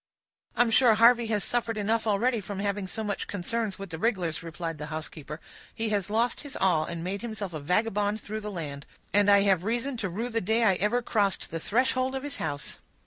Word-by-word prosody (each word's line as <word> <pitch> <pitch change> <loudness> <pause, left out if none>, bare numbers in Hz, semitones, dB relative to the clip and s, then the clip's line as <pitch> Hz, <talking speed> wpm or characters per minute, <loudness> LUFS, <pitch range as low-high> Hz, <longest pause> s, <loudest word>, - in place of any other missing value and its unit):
"I'm 240 -1 +4
sure 230 -1 +6
Harvey 235 +1 +6
has 210 -2 0
suffered 235 -2 -1
enough 220 +2 0
already 220 +3 +2
from 200 0 -6
having 200 -1 -1
so 220 +4 -4
much 205 -1 -3
concerns 205 +2 -2
with 195 -3 -7
the 160 - -5
rig'lars," 180 -7 0
replied 165 -1 -5
the 150 - -5
housekeeper. 155 0 -7 0.4
"He 225 0 -1
has 205 -3 -1
lost 230 +3 +1
his 285 - -8
all, 170 -5 +2
and 170 0 -5
made 195 +3 -3
himself 215 -6 -5
a 155 - -4
vagabond 205 +6 +1
through 215 +1 -5
the 210 - -5
land; 145 -6 -6 0.3
and 205 0 +5
I 200 0 +7
have 190 -4 +3
reason 240 +5 -1
to 205 -4 -2
rue 225 +8 -3
the 230 -1 -1
day 220 +5 +2
I 205 -4 +5
ever 210 +6 +1
crossed 205 -5 0
the 165 - -3
threshold 255 +6 +1
of 265 - -3
his 290 -2 -3
house." 145 -2 -4
205 Hz, 215 wpm, -28 LUFS, 180-230 Hz, 0.4 s, I